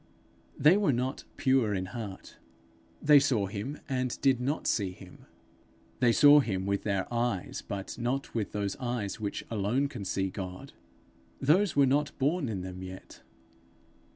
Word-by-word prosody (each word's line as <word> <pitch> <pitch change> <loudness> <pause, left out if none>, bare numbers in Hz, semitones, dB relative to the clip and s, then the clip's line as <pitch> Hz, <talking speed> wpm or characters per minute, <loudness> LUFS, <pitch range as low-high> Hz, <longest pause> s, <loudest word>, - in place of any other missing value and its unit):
They 160 +6 +6
were 205 -7 +2
not 130 +2 -2
pure 130 -7 +2
in 95 -1 -2
heart; 105 -5 -7 0.7
they 145 -1 +8
saw 130 -8 +1
him 105 +9 -5
and 130 -3 -2
did 135 -3 +3
not 140 +5 -2
see 95 -4 0
him. 95 -1 -15 0.7
They 125 -2 +4
saw 145 +4 +7
him 95 -8 -1
with 100 0 0
their 100 -3 -1
eyes, 120 -6 -1
but 100 +3 -6
not 125 +3 -2
with 110 -3 -2
those 100 -1 -2
eyes 120 -5 -3
which 105 -2 -4
alone 115 +6 0
can 120 -7 -7
see 95 0 -1
God. 90 -1 -7 0.7
Those 170 +6 +3
were 140 -1 +5
not 145 +3 0
born 145 0 0
in 100 -4 -3
them 90 0 -7
yet. 95 0 -10
120 Hz, 155 wpm, -29 LUFS, 100-135 Hz, 0.7 s, they